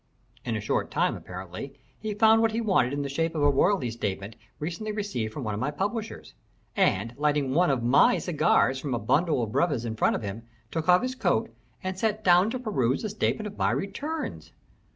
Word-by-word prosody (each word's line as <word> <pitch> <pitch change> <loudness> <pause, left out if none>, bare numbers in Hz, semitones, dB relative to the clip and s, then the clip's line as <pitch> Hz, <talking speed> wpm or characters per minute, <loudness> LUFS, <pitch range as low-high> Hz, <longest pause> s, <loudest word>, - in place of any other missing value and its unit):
In - - -2
a - - -1
short - - -1
time, - - +1
apparently, - - -8 0.2
he 215 -1 -4
found 220 +1 +5
what 225 -1 +2
he 225 - 0
wanted 190 - +2
in 145 0 -2
the - - -3
shape 165 +4 -1
of 150 - 0
a 145 - +5
royalty 140 - +2
statement 105 -2 -4 0.2
recently 175 +8 -4
received 200 - -3
by - - -4
me - - -5
from 105 - -3
my 130 +5 -1
publishers, 205 - -4 0.4
and, 105 +5 +1
lighting 145 -2 +1
one 175 +4 +3
of 130 -4 0
my 140 - +5
cigars 155 -5 +2
from 135 -3 -2
a - - -2
bundle 145 - +1
of 110 - -4
brevas 135 -4 +1
in 110 -1 -3
front - - +2
of - - -4
him, 100 +2 -5 0.3
took 165 +1 -2
off 180 +4 +6
his 255 0 -1
coat 255 - 0 0.3
and 185 0 -4
sat 215 0 0
down 180 +3 +5
to 255 - -2
peruse 145 - 0
the 215 - -2
statement 215 +1 -1
of 205 -1 -8
my - - +2
returns. 290 +11 -4
165 Hz, 215 wpm, -27 LUFS, 125-210 Hz, 0.4 s, off